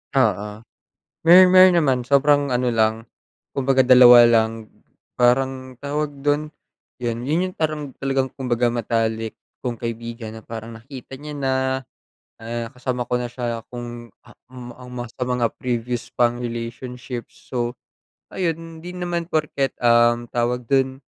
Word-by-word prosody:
Oo, 105 -3 0 0.6
mer 180 +2 +10
meron 185 -1 +7
naman. 135 -7 +3
Sobrang 140 -1 +3
ano 125 -1 +1
lang, 110 0 +1 0.5
kumbaga 135 -1 +2
dalawa 125 -1 +9
lang. 115 -1 +2 0.5
Parang 130 +1 +1
tawag 145 +1 -4
dun 145 +1 +1 0.6
yan, 120 0 -2
yun 175 +5 +1
yung - - -24
parang 155 -3 -2
talagang 135 -1 -1
kumbaga 120 -2 0
matalik 115 -1 -1 0.3
kong 125 -2 -3
kaibigan 115 -1 -6
na - - -10
parang 115 0 -7
nakita 130 +2 -10
niya 150 +2 -8
na, 135 -2 -1 0.9
ah, 115 +1 -4
kasama 125 -1 -3
ko 125 - -5
na 125 - -3
siya 120 -1 -4
kung, 120 -1 -8 0.2
ah, - - -17
um, 125 -1 -10
almost 125 -1 -8
sa 125 - -1
mga 125 -2 0
previous 120 -1 -2
pang 120 0 +2
relationships. 120 +1 -6 0.2
So 120 -1 -2 0.6
ayun 165 -2 -4
di 180 - -7
naman 175 -1 -4
porket, 145 -4 0
um, 120 0 +3
tawag 120 0 -2
dun 135 0 +1
125 Hz, 140 wpm, -22 LUFS, 120-140 Hz, 0.9 s, mer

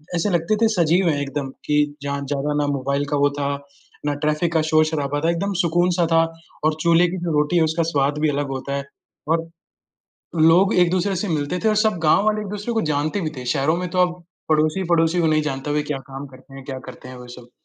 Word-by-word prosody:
ऐसे 175 +5 0
लगते 175 +4 +1
थे 225 - +5
सजीव 175 +1 +3
हैं 145 -3 0
एकदम, 140 -1 -3 0.2
कि 150 0 +1
जहाँ 140 0 -3
ज़्यादा 145 +1 -2
ना 145 - -1
मोबाइल 140 +1 -1
का 145 - +2
वो 145 0 +3
था, 140 0 0 0.6
ना 145 - +1
ट्रैफिक 155 +2 0
का 160 - +3
शोर-शराबा 155 -2 +1
था, 165 - +1
एकदम 195 +4 -1
सुकून 175 +1 +2
सा 170 - +4
था 165 0 +5 0.4
और 155 0 +2
चूल्हे 170 +1 +4
की 185 +2 -4
जो 175 -1 -3
रोटी 150 +4 +1
है, 165 - +4
उसका 160 +1 0
स्वाद 140 +1 +1
भी 155 - +3
अलग 145 0 -1
होता 140 +1 -4
है। 140 - -3 0.4
और 165 +1 0 1.0
लोग 190 +5 +4
एक-दूसरे 185 +3 0
से 200 +4 -2
मिलते 155 +1 -1
थे 220 - +4
और 215 - +2
सब 215 -4 +2
गाँव 160 +6 +4
वाले 215 0 +2
एक 210 - -6
दूसरे 210 +3 -4
को 225 - +2
जानते 155 +7 -1
भी 155 -4 -2
थे, 125 - -6
शहरों 150 +4 +1
में 180 +1 -3
तो 185 - -2
अब 175 0 -9 0.3
पड़ोसी, 155 +4 +2
पड़ोसी 170 0 +2
को 165 - +2
नहीं 155 -1 +2
जानता, 135 -1 -3
वे 150 0 +1
क्या 135 - -3
काम 135 +1 -7
करते 135 0 -16
हैं, 135 - -10
क्या 135 -1 -5
करते - - -10
हैं, 130 - -9
वो 125 - -11
सब। 120 0 -12
155 Hz, 240 wpm, -21 LUFS, 145-175 Hz, 1.0 s, थे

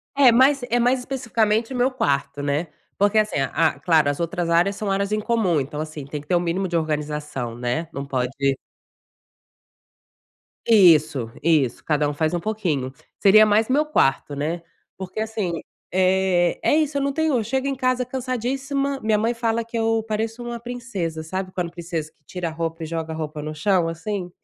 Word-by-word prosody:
É, 275 -3 +7
mas 265 +4 +5
é 240 - +2
mais 250 +2 +3
especificamente 230 -3 0
o - - -4
meu 250 +1 +3
quarto, 140 - -1
né? 145 +4 -1 0.3
Porque, 205 +2 +3
assim, 215 0 0
a 140 +2 +1
claro, 155 -1 +3
as 145 - -2
outras 170 0 -2
áreas 175 +4 +3
são 205 0 -3
áreas 200 +1 0
em 215 - +1
comum, 210 -7 +1
então, 145 +2 -6
assim, 155 -2 -5
tem 150 +2 -5
que 145 - -20
ter 180 - +2
o - - +4
mínimo 175 +2 -1
de 175 - -3
organização, 150 -6 -2
né, 125 +7 -2
não 140 - -4
pode 130 -2 -1 2.4
Isso, 155 - +5
isso, 145 -6 +2
cada 150 -1 +1
um - - -3
faz 155 +2 0
um 175 - 0
pouquinho. 170 -11 -2 0.3
Seria 215 +2 +7
mais 215 +2 +2
meu 290 +4 +3
quarto, 145 - +1
né? 155 +4 -2 0.4
Porque 190 +2 -6
assim, 210 -7 -2 0.3
eh, 185 -1 +2
é - - +3
isso, 305 -2 +1
eu - - 0
não 280 0 0
tenho, 315 -1 +1
eu 230 - 0
chego 265 +5 -1
em 275 - -1
casa 255 -1 0
cansadíssima, 265 +2 -2
minha 215 -1 +2
mãe 225 +3 +1
fala 230 -1 -1
que 230 +1 -6
eu 225 0 +1
pareço 225 +2 -3
uma 240 0 -5
princesa. 230 -10 -4
Sabe 185 +3 -4
quando 175 -2 -3
princesa 165 -3 -5
que 150 - -43
tira 180 0 -4
a - - -7
roupa 165 0 -4
e - - -3
joga 160 0 -4
a - - -5
roupa 155 -1 -5
no 155 +1 -5
chão 175 +2 +2
assim? 180 +3 -4
185 Hz, 195 wpm, -23 LUFS, 155-230 Hz, 2.4 s, É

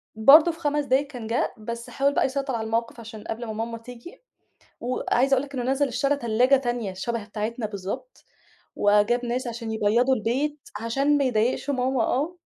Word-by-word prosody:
برضه 290 +10 +7
في 325 - -13
5 295 -2 0
دقايق 275 +2 +2
كان 245 -5 -8
جا، 230 +2 0
بس 235 +2 -6
حاول 280 +1 +1
بقى - - +2
يسيطر 270 -1 -2
على 220 -1 -3
الموقِف؛ 230 +1 -1
عشان 220 -2 -9
قبل 225 +2 -5
ما 220 - -5
ماما 230 +1 -4
تيجي. 245 +7 -12 0.6
وعايزة 255 +2 +1
أقول 265 - +1
لك 280 0 -13
إنه 250 - -2
نزل 280 +1 +1
اشترى 275 +3 +1
تلاجة 245 +2 +3
تانية 240 -6 -2
شَبَه 220 +4 -3
بتاعتنا 215 +2 -4
بالضبط 205 - -7 0.5
وجاب 210 +4 +3
ناس 245 +2 -2
عشان 230 -1 -5
يبيضوا 225 +5 +2
البيت؛ 270 +7 -1 0.3
عشان 275 +5 +2
ما 280 - +2
يضايقش 245 +3 0
ماما 260 -2 +1
آه. 300 +10 -1
245 Hz, 180 wpm, -25 LUFS, 225-275 Hz, 0.6 s, برضه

